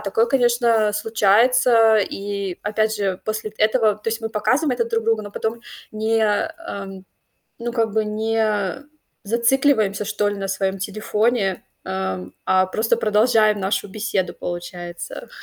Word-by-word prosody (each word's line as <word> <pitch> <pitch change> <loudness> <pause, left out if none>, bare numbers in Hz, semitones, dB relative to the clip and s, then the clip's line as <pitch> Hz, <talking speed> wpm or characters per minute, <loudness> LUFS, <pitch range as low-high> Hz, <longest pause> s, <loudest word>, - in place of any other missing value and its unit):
такое, 215 +3 +1
конечно, 235 -4 +2
случается. 225 +2 +4
И 200 -2 -3
опять 215 +1 0
же, 195 -2 -2
после 215 0 -3
этого 215 0 +3
То 215 - -4
есть 225 +1 -2
мы 225 - -3
показываем 260 +7 +1
это 245 -2 0
друг 230 -1 -2
другу, 225 -1 +1
но 205 - -8
потом 225 +3 -3 0.3
не, 220 +1 0
ам, 205 - -3 0.6
ну, 240 0 -3
как 225 -3 0
бы 220 -1 +1
не 215 +1 -1 0.4
зацикливаемся, 230 -2 +2
что 210 0 0
ли, 205 - -1
на 195 -1 -4
своем 195 0 -1
телефоне, 210 0 -1 0.2
ам, 95 -1 -4
а 185 0 +3
просто 225 +4 0
продолжаем 215 -1 +3
нашу 195 +2 -1
беседу, 205 -2 -2
получается. 175 - -7
215 Hz, 140 wpm, -21 LUFS, 200-230 Hz, 0.6 s, случается